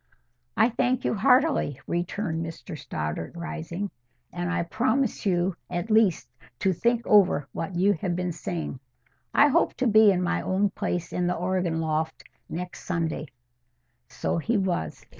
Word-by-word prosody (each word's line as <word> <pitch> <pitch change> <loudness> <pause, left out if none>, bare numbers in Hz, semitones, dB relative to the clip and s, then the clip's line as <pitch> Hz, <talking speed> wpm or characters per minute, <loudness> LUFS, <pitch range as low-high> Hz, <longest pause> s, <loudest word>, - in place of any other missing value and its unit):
"I 220 +2 +5
thank 245 +2 0
you, - - +2
heartily," 250 - +3
returned 170 -1 -2
Mr 165 +1 -7
Stoddart, 80 - -4
rising. 170 +3 -5 0.4
"And 175 0 -2
I 180 -1 0
promise 235 +5 0
you 180 0 +1
at 175 +4 -3
least 205 - +3 0.3
to 190 +7 +1
think 235 +6 +1
over 185 -9 +4
what 175 +2 -4
you 195 +4 +4
have 175 0 -2
been 180 0 -1
saying—I 160 - -2
hope - - +2
to 260 - -1
be 215 -2 +7
in 180 -1 0
my 175 - 0
old 195 +1 +1
place 175 -1 -3
in 180 0 0
the 180 - +1
organ 180 -2 -1
loft 160 0 -2 0.3
next 180 +2 -6
Sunday." 165 -4 -2 0.8
So - - -2
he 225 +7 0
was. 180 - -2
180 Hz, 150 wpm, -26 LUFS, 165-205 Hz, 0.8 s, be